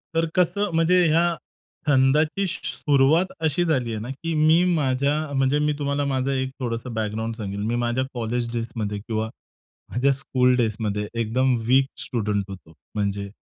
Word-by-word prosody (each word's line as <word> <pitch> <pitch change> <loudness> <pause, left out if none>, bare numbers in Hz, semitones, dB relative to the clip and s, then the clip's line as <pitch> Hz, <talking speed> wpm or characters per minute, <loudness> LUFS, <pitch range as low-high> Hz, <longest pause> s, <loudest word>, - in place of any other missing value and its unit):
तर 165 0 +3
कसं 200 +3 +1
म्हणजे 175 +2 +4
या 165 +2 +4 0.6
छंदाची 150 +7 +3
सुरुवात 150 0 +2 0.2
अशी 160 +2 +1
झालीये 125 -9 0
ना, 115 +4 -6
की 165 +5 -4
मी 155 +3 +5
माझ्या 140 -1 +1 0.2
म्हणजे 135 +1 +2
मी 150 0 +1
तुम्हाला 140 0 0
माझा 135 0 0
एक 130 -1 -1
थोडंसं 120 -1 -4
बॅकग्राऊंड 110 +1 -2
सांगेन. 100 -2 -5
मी 120 - 0
माझ्या 120 +2 0
कॉलेज 120 0 -2
डेज 115 0 -2
मध्ये 105 -2 -2
किंवा 110 +1 -3 0.6
माझ्या 135 +3 +2
स्कूल 125 -2 +2
डेज 110 -4 +1
मध्ये 105 -1 -2
एकदम 125 +3 +1
वीक 135 +2 +5 0.2
स्टुडंट 105 -4 -1
होतो. 90 -4 -11 0.2
म्हणजे 100 -1 -2
130 Hz, 155 wpm, -24 LUFS, 110-145 Hz, 0.6 s, मी